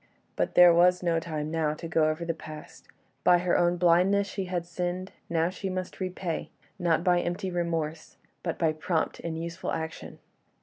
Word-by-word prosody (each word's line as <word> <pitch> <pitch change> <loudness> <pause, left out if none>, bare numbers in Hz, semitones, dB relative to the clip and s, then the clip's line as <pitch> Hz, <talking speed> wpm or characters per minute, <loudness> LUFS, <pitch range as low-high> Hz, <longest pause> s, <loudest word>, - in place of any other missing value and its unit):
But - - -1
there 175 -1 +9
was 180 +1 +4
no 170 -2 +2
time 155 -2 -4
now 155 -2 0
to 165 - -7
go 160 -1 +2
over 155 +2 -3
the 165 - -1
past. 155 -1 -11 0.4
By 180 - +6
her 175 0 +1
own 175 0 +3
blindness 180 +4 +4
she 195 -1 -4
had 180 -2 -3
sinned; 180 +2 -3 0.2
now 165 +1 +1
she 190 +1 -5
must 185 0 -5
repay, 185 -3 -3 0.3
not 170 -2 +2
by 180 -1 +4
empty 185 +2 -3
remorse, 165 -3 -3 0.2
but 170 - -3
by 160 -2 +2
prompt 160 +1 -1
and 165 -1 -4
useful 170 +2 -4
action. 160 0 -5
170 Hz, 180 wpm, -28 LUFS, 160-180 Hz, 0.4 s, there